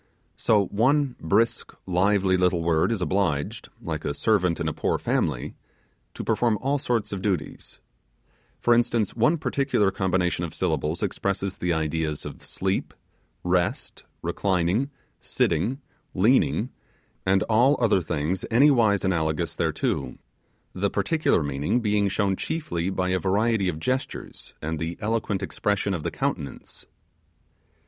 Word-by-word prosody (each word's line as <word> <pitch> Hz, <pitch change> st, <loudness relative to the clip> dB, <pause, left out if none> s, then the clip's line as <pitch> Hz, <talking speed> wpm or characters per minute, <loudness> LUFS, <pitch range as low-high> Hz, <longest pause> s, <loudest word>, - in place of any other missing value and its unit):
So 105 Hz, -3 st, +3 dB
one 135 Hz, +5 st, +2 dB
brisk, 105 Hz, +8 st, +1 dB
lively 95 Hz, +1 st, +2 dB
little 90 Hz, -2 st, +2 dB
word 80 Hz, +5 st, +2 dB
is 105 Hz, -6 st, 0 dB
obliged, 90 Hz, -7 st, -1 dB
like 80 Hz, -2 st, -4 dB
a 70 Hz, -, -2 dB
servant 90 Hz, -7 st, +2 dB
in 85 Hz, -, -1 dB
a 80 Hz, -, -1 dB
poor -, -, 0 dB
family, -, -, -1 dB, 0.6 s
to -, -, -5 dB
perform 115 Hz, -3 st, +1 dB
all 140 Hz, +2 st, 0 dB
sorts 120 Hz, -5 st, -1 dB
of 100 Hz, -2 st, -4 dB
duties; 95 Hz, -7 st, -3 dB, 0.8 s
for 120 Hz, -, +4 dB
instance, 120 Hz, -3 st, +1 dB
one 120 Hz, +9 st, +3 dB
particular 135 Hz, -9 st, +1 dB
combination 90 Hz, -3 st, 0 dB
of 85 Hz, -, -5 dB
syllables 80 Hz, -2 st, -1 dB
expresses 100 Hz, -1 st, -2 dB
the 90 Hz, -, -1 dB
ideas 80 Hz, -1 st, -1 dB
of -, -, -8 dB
sleep, 95 Hz, 0 st, -2 dB, 0.5 s
rest, 90 Hz, -1 st, -1 dB, 0.2 s
reclining, 95 Hz, +7 st, 0 dB, 0.3 s
sitting, 110 Hz, -, 0 dB, 0.4 s
leaning, 115 Hz, +3 st, +3 dB, 0.5 s
and 95 Hz, 0 st, +3 dB
all 120 Hz, +6 st, +4 dB
other 110 Hz, -6 st, +3 dB
things 80 Hz, +3 st, -2 dB
anywise 115 Hz, -6 st, +4 dB
analogous 80 Hz, -4 st, 0 dB
thereto, -, -, -1 dB, 0.6 s
the 100 Hz, +2 st, 0 dB
particular 100 Hz, -, +1 dB
meaning 70 Hz, -, 0 dB
being 105 Hz, -3 st, +1 dB
shown 100 Hz, 0 st, +1 dB
chiefly 95 Hz, -, -2 dB
by 90 Hz, -1 st, -1 dB
a 95 Hz, 0 st, +1 dB
variety 100 Hz, +1 st, +1 dB
of 80 Hz, -, -3 dB
gestures 130 Hz, +9 st, -4 dB
and 80 Hz, 0 st, -2 dB
the 80 Hz, +1 st, -3 dB
eloquent 105 Hz, -2 st, -1 dB
expression 100 Hz, +1 st, -1 dB
of 85 Hz, -, -2 dB
the -, -, -2 dB
countenance. -, -, -4 dB
95 Hz, 135 wpm, -25 LUFS, 85-115 Hz, 0.8 s, for